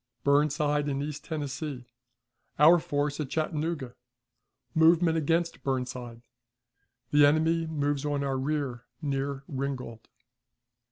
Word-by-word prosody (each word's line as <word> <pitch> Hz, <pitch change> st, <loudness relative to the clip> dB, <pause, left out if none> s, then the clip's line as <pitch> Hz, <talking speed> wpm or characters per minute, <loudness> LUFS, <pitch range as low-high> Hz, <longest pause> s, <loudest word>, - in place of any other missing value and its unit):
Burnside 145 Hz, 0 st, +2 dB
in 135 Hz, -1 st, -1 dB
East 150 Hz, 0 st, -5 dB
Tennessee. 145 Hz, -3 st, -4 dB, 0.7 s
Our 165 Hz, +4 st, +7 dB
Force 145 Hz, -1 st, -2 dB
at 145 Hz, -4 st, -3 dB
Chattanooga. 155 Hz, -4 st, -2 dB, 0.8 s
Movement 165 Hz, 0 st, +4 dB
against 165 Hz, +2 st, 0 dB
Burnside. 125 Hz, -3 st, -4 dB, 0.9 s
The 145 Hz, 0 st, +6 dB
Enemy 160 Hz, +3 st, +3 dB
moves 145 Hz, -2 st, -1 dB
on 145 Hz, -1 st, -1 dB
our 135 Hz, -1 st, -1 dB
Rear 135 Hz, -3 st, -2 dB
near 140 Hz, -2 st, -2 dB
Ringgold. 130 Hz, -5 st, -5 dB
145 Hz, 105 wpm, -28 LUFS, 135-155 Hz, 0.9 s, Our